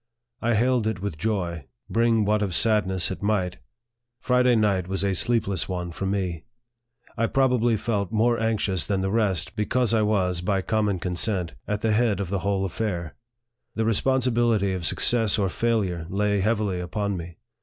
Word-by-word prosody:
I 120 0 +1
hailed 120 0 +2
it 110 -4 -2
with 95 -5 -5
joy, 85 -8 -2 0.2
bring 115 -2 +2
what 105 +1 +1
of 95 -4 -1
sadness 95 -5 +2
it 95 - -6
might 100 -4 -1 0.6
Friday 125 -1 +3
night 100 -5 +1
was 95 0 -2
a 100 -1 +1
sleepless 100 -3 0
one 90 -1 -3
for 95 +3 -4
me. 90 -5 -2 0.7
I 115 0 +1
probably 125 -3 +2
felt 105 -2 -2
more 115 +2 +2
anxious 105 -5 0
than 100 -2 0
the 95 0 -1
rest, 100 -4 0
because 115 +2 0
I 110 - +3
was, 95 -5 +1
by 95 +1 0
com 110 +1 0
mon 100 -2 0
consent, 90 0 -2
at 105 0 -2
the 110 - +1
head 110 -2 +2
of 100 -3 -3
the 100 0 -1
whole 95 0 0
affair. 90 -4 -3 0.6
The 110 - 0
responsibility 115 -3 +1
of 90 -3 -2
success 115 -3 +3
or 100 -3 +1
failure 95 -7 -1
lay 100 +1 +1
heavily 105 -2 0
upon 100 +3 -2
me. 85 -2 -8
100 Hz, 175 wpm, -25 LUFS, 95-115 Hz, 0.7 s, Friday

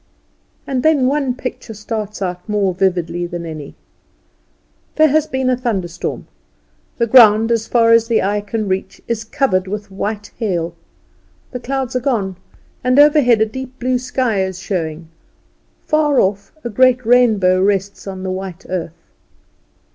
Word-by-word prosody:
And 260 -2 -1
then 300 -3 +3
one 270 -2 0
picture 250 -3 -7
starts 210 -1 -5
out 180 +2 -5
more 200 -3 +1
vividly 175 -2 -1
than 175 -1 -6
any. 155 -3 -8 1.2
There 315 0 +5
has 310 +2 +2
been 265 -1 -2
a 255 - +3
thunderstorm; 195 -9 -3 0.7
the 235 - +2
ground, 225 -2 +6
as 225 -1 0
far 230 -1 +3
as 230 0 +5
the 230 -1 +2
eye 205 +2 0
can 210 +1 -3
reach, 190 0 -3
is 230 -1 -2
covered 225 -7 0
with 205 +1 -6
white 210 +2 -4
hail; 175 -7 -1 0.8
the 250 - -5
clouds 265 0 -3
are - - +2
gone, 220 -8 -1 0.5
and 255 +1 +2
overhead 290 -6 +5
a - - +5
deep 260 +3 -8
blue 255 0 0
sky 250 -5 -1
is 190 -1 -4
showing; 165 -4 -4 0.8
far 300 -3 +2
off 200 +1 0
a 240 - -3
great 255 +1 +3
rainbow 215 -7 +4
rests 200 0 -1
on 190 -1 -6
the 190 - -3
white 185 -1 -6
earth. 170 -2 -5
215 Hz, 155 wpm, -18 LUFS, 190-255 Hz, 1.2 s, ground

